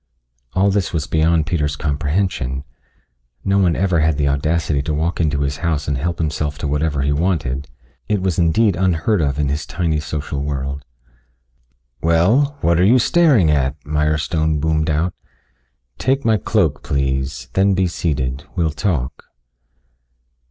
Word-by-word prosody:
All 100 +2 +3
this 100 -2 0
was 80 -3 -1
beyond 80 0 +2
Peter's 75 -4 -1
comprehension. 75 -2 -1 0.8
No 100 0 +2
one 90 -4 +3
ever 90 -3 +1
had 80 -1 +2
the 70 -1 +1
audacity 75 +1 0
to 75 +1 -2
walk 85 +3 -1
into 75 -3 0
his 70 0 -1
house 75 -3 -1
and 70 - 0
help 85 +6 -2
himself 75 -2 -2
to 75 - -3
whatever 75 -1 0
he 70 - +1
wanted 70 -4 -1 0.4
he 105 - +1
was 95 -3 -1
indeed 85 +4 +3
unheard 90 +2 +1
of 70 -2 0
in 75 -2 0
his 75 +2 -2
tiny 80 -3 -1
social 75 -1 -4
world. 70 -1 -3 1.2
"Well, 110 - +3
what 85 0 +2
are - - +4
you 115 +7 +5
staring 130 - +4
at?" 70 -2 +1
Mirestone 75 +1 0
boomed 80 +1 0
out. 80 +4 0 0.9
"Take 135 +2 0
my 110 -1 +4
cloak, - - 0
please, 65 -2 -2
then 95 0 +3
be 95 0 +2
seated. 70 -6 -2
We'll 85 -4 +1
talk." 75 -4 -2
80 Hz, 150 wpm, -19 LUFS, 70-90 Hz, 1.2 s, you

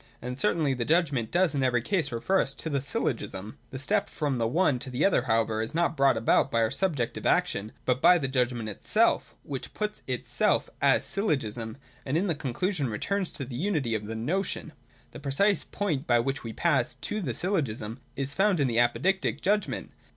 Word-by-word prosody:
And 125 +2 -6
certainly 160 -9 +2
the 125 -2 -2
judgment 145 -6 +1
does 175 -3 +2
in 140 - 0
every 125 -3 +2
case 180 0 0
refer 155 +12 +1
us 135 - -3
to 160 - -5
the 140 -2 0
Syllogism. 110 -6 -3
The 130 - -6
step 200 +10 0
from 140 -5 -2
the 115 - +1
one 145 0 +2
to 130 - -6
the 125 +3 +1
other 195 - +4
however 115 -2 +1
is 110 +7 -4
not 170 -1 +1
brought 135 -2 +4
about 110 - +3
by 115 - +1
our 110 - 0
subjective 150 -12 0
action, 105 +3 +1
but 130 +1 +1
by 180 - +7
the 140 -5 -1
judgment 125 -3 0
itself 105 - +1
which 135 -3 -6
puts 210 0 -3
itself 125 -2 +1
as - - +4
Syllogism, 125 - -1 0.3
and 140 +4 -1
in 185 - +1
the 175 - +1
conclusion 145 +2 -2
returns 185 - -1
to 140 - -5
the 125 -1 -7
unity 150 - 0
of 105 -1 -2
the 115 - -4
notiorf. 165 - -2 0.4
The - - -9
precise 150 +9 +2
point 160 -8 -2
by 120 - +4
which 135 +4 -1
we 115 - -5
pass 145 +4 +1
to 215 - -4
the 130 - -3
Syllogism 130 - -1 0.2
is 140 +1 -2
found 195 -1 +2
in 140 - +3
the 115 -1 +1
Apodictic 140 - +1
judgment. 205 +2 0
135 Hz, 200 wpm, -28 LUFS, 120-175 Hz, 0.4 s, by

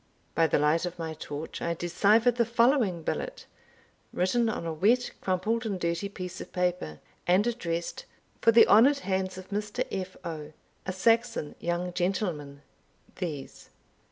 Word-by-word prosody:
By 165 0 +3
the - - +2
light 150 +4 +2
of 175 0 -7
my 165 -1 -4
torch, 155 0 -7
I 170 0 -1
deciphered 215 +8 +3
the 235 - +4
following 235 - +2
billet, - - -4 0.7
written 225 +6 +1
on 210 - -3
a 165 - -2
wet, 225 +10 +2
crumpled, 205 +5 0
and 205 -5 -3
dirty 170 +3 -1
piece 185 -2 -7
of - - -9
paper, 180 - -1 0.3
and 185 +4 +4
addressed 170 -8 -3 0.4
"For 230 - +6
the 230 +1 +8
honoured 275 +7 +6
hands 190 -1 -1
of 185 +2 -10
Mr. 210 +5 -2
F. 185 -1 -4
O., 155 -2 -6 0.3
a - - 0
Saxon 230 -3 +1
young 175 +1 -2
gentleman 175 -6 -2 0.5
These." 155 -7 -6
185 Hz, 155 wpm, -28 LUFS, 170-225 Hz, 0.7 s, the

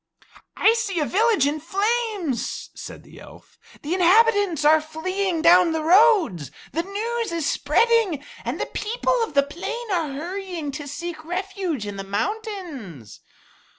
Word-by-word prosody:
"I 445 - +5
see 415 -6 -2
a 300 - +1
village 425 - +2
in 295 +2 -1
flames," 395 - -2
said - - -10
the - - -15
elf. - - -16 0.2
"The 300 +4 -2
inhabitants 380 -3 +3
are 310 +1 +6
fleeing 335 +2 -2
down 345 0 +6
the 320 -1 -2
roads. 350 - +4 0.2
The 330 - -1
news 440 +4 -3
is 330 -3 -2
spreading, 370 - +2 0.2
and - - -4
the - - -1
people 460 +5 -2
of 315 - -6
the 280 - +5
plain 405 +10 -6
are 335 -5 0
hurrying 345 +1 -5
to 290 +1 -7
seek 315 +2 -6
refuge 360 - -3
in 205 -1 -6
the 195 - -5
mountains." 260 - -5
345 Hz, 150 wpm, -23 LUFS, 300-415 Hz, 0.2 s, are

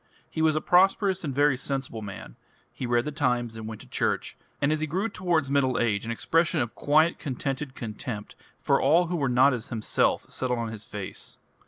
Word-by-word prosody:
He 160 - -4
was 160 -1 +3
a 155 - 0
prosperous 190 +1 +3
and 150 - -2
very 145 +1 +3
sensible 135 -3 -4
man; 95 - -8 0.4
he 125 - -4
read 120 0 +2
the 150 - -2
Times 125 -6 0
and 110 -1 -7
went 110 -1 -7
to - - -13
church, - - -1 0.2
and 140 +1 +2
as 155 - +1
he 155 - -1
grew 185 +8 -1
towards 175 -8 0
middle 135 -2 +2
age 110 -2 0
an - - -2
expression 165 +7 +1
of 120 -3 -1
quiet 155 +3 +3
contented 135 0 -3
contempt 105 -1 -6 0.2
for - - +2
all 175 +3 +4
who 180 - -1
were 140 -5 0
not 130 +3 +5
as 120 -3 -5
himself 110 -3 0
settled 125 -1 -2
on 115 -1 -2
his 110 -1 -8
face. 100 -3 -7
135 Hz, 205 wpm, -27 LUFS, 115-155 Hz, 0.4 s, not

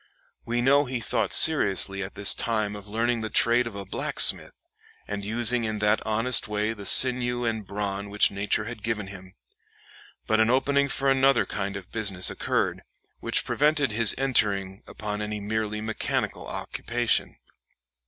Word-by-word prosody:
We 120 +1 -2
know 140 +3 +3
he 125 -1 -4
thought 115 - -2
seriously 100 - +3
at 95 0 -7
this 105 - +4
time 110 -3 -1
of 105 0 -10
learning 115 +2 -1
the 110 - -4
trade 120 +2 +2
of 115 - -8
a 100 -1 -7
blacksmith, 95 - +2 0.4
and 100 0 -5
using 120 +3 +1
in 110 -1 -3
that 105 +1 0
honest 115 +1 +2
way 105 +1 -2
the 100 -3 -7
sinew 120 -1 +4
and 110 -3 -3
brawn 100 0 -4
which 105 +1 +2
nature 100 +2 -1
had 115 -1 -8
given 110 -2 -3
him. 95 -1 -13 0.9
But 110 0 +1
an 110 0 +3
opening 140 +2 +1
for 135 0 -1
another 135 -1 +3
kind 100 0 -4
of 95 -2 -11
business 100 -5 0
occurred, - - -2 0.4
which - - -1
prevented 150 -3 +1
his 110 0 +3
entering 100 -7 0
upon 105 -1 -6
any 105 0 -4
merely 105 +1 -3
mechanical 110 0 -3
occupation. 120 0 -2
110 Hz, 160 wpm, -25 LUFS, 105-120 Hz, 0.9 s, this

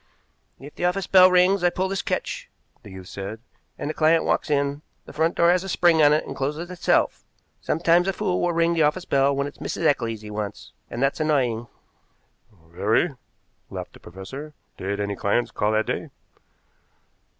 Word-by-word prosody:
"If 145 +2 -11
the - - -3
office 180 +1 0
bell 185 -1 +7
rings 180 +1 +3
I 175 - +5
pull 185 +2 -2
this 195 0 -2
catch," - - -3 0.3
the - - -13
youth 95 -1 -10
said, 100 +4 -6 0.4
"and - - -4
the 155 - -2
client 160 +1 +3
walks - - 0
in. 140 0 0 0.2
The - - -12
front 160 +2 +1
door 170 0 +4
has 180 +1 +1
a 195 - -6
spring 170 -3 +4
on 145 -1 +6
it 150 - +2
and - - -7
closes 150 +6 -3
itself. 180 - +1 0.4
Sometimes 170 +3 +2
a 195 - +1
fool 185 -2 -1
will 175 - +1
ring 170 0 +2
the 165 - +1
office 155 +5 +1
bell 140 0 +2
when 140 0 -1
it's 145 - -9
Mrs. - - -4
Eccles 115 -6 +1
he 105 -1 -9
wants, 105 -1 -6 0.2
and 120 - -3
that's 135 +3 +1
annoying." 125 -7 0 1.0
"Very," 105 - +1 0.6
laughed - - -7
the - - -15
professor. 130 - -9 0.2
"Did 100 +2 -4
any 100 0 -2
clients 100 +5 0
call 105 +1 0
that 110 0 +1
day?" - - -3
150 Hz, 190 wpm, -24 LUFS, 110-175 Hz, 1.0 s, bell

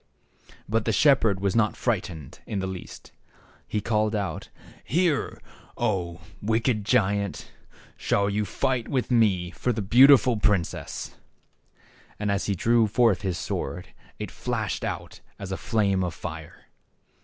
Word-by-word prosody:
But 110 +1 0
the 115 - +2
shepherd 115 -7 +3
was 100 +1 0
not 110 -2 +2
frightened 90 - -3
in 105 - -3
the 95 - -1
least. 95 -1 -8 0.6
He 105 - -2
called 110 0 0
out, 100 -2 -3 0.2
" - - -23
Here, 175 -5 +1 0.4
0, 85 -4 -1 0.2
wicked 110 +1 +1
giant, 100 -2 0 0.5
shall 100 0 +1
you 105 +1 0
fight 130 +4 -1
with 130 -2 -1
me 100 -7 +2
for 125 - -1
the 110 -3 -2
beautiful 125 +2 +6
prin 105 -4 +3
cess." - - -7 1.0
And, 105 -1 -1
as 100 0 -1
he 100 - 0
drew 115 +4 +3
forth 115 -3 +3
his 95 -3 -2
sword, 85 +3 -4 0.3
it - - -6
flashed - - -3
out - - -5 0.2
as 95 -1 -7
a - - -1
flame 100 -3 0
of 90 - -3
fire. - - -8
105 Hz, 145 wpm, -26 LUFS, 95-115 Hz, 1.0 s, beautiful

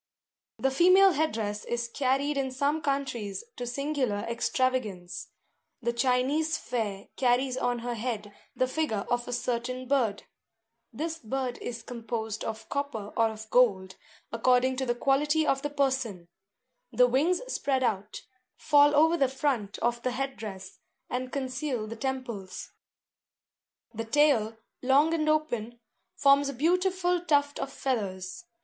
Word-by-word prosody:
The 270 - +1
female 370 +7 +6
head 315 0 +1
dress 210 -1 -3
is 240 0 -2
carried 275 +4 0
in 270 -1 0
some 285 +4 0
countries 270 - -2
to 245 - -5
singular 255 -5 -1
extravagance. 230 -7 -1 0.5
The 235 -1 -1
Chinese 265 +6 +1
fair 205 -5 -3
carries 255 0 +2
on 245 -1 0
her 245 - -1
head 215 -3 -4 0.2
the 255 - +2
figure 260 -8 -1
of 240 0 0
a - - -4
certain 245 +1 -2
bird. 240 -7 +1 0.7
This 320 +7 -4
bird 255 +1 -3
is 235 -1 -6
composed 225 -2 -4
of 220 0 -5
copper 275 -8 -3
or 225 -1 +3
of 220 0 -8
gold, 195 -7 +3 0.4
according 250 +3 +3
to 265 0 -1
the 240 - +1
quality 295 +5 +2
of 270 -2 +1
the 290 - -2
person; 260 -11 -1 0.6
the 250 - +5
wings 290 +9 +2
spread 270 - 0
out, 210 -3 -2 0.3
fall 290 -1 +5
over 320 +3 +5
the 270 -4 +3
front 265 -7 -1
of 240 0 +1
the 255 0 -1
head 270 +1 -2
dress, 190 -3 -8 0.3
and 255 +1 -3
conceal 255 -3 -2
the 220 +1 -6
temples. 240 -7 -5 1.2
The 225 +1 -4
tail, 225 -4 +3 0.2
long 280 +5 +4
and 310 -2 +1
open, 240 -7 -1 0.4
forms 280 0 +4
a - - -4
beautiful 360 +4 +1
tuft 285 -3 +2
of 275 - -3
feathers. 205 - -3
255 Hz, 140 wpm, -28 LUFS, 225-285 Hz, 1.2 s, female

